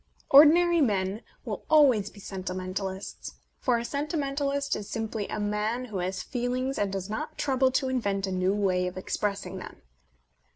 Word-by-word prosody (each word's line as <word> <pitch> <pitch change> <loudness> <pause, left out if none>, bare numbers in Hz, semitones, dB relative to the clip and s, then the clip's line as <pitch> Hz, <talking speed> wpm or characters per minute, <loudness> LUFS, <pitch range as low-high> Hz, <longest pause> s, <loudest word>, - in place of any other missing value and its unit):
Ordinary 330 +4 +7
men 200 -4 +1 0.2
will - - -4
always 265 -10 +5
be 205 - -15
sentimentalists: 190 0 -5 0.2
for 245 -2 +2
a 235 - -3
sentimentalist 280 -1 -1
is 205 -1 -6
simply 220 -2 -3
a - - -4
man 210 +4 -1
who 210 -6 -5
has 185 +1 -2
feelings 255 +1 -2
and 205 -1 0
does 190 -1 -3
not 215 +1 -5
trouble 265 -2 +2
to 265 - +1
invent 200 -7 0
a 190 - -4
new 185 +1 +1
way 185 -3 +1
of 180 - -6
expressing 200 +1 -3
them. - - -11
215 Hz, 160 wpm, -28 LUFS, 195-270 Hz, 0.2 s, Ordinary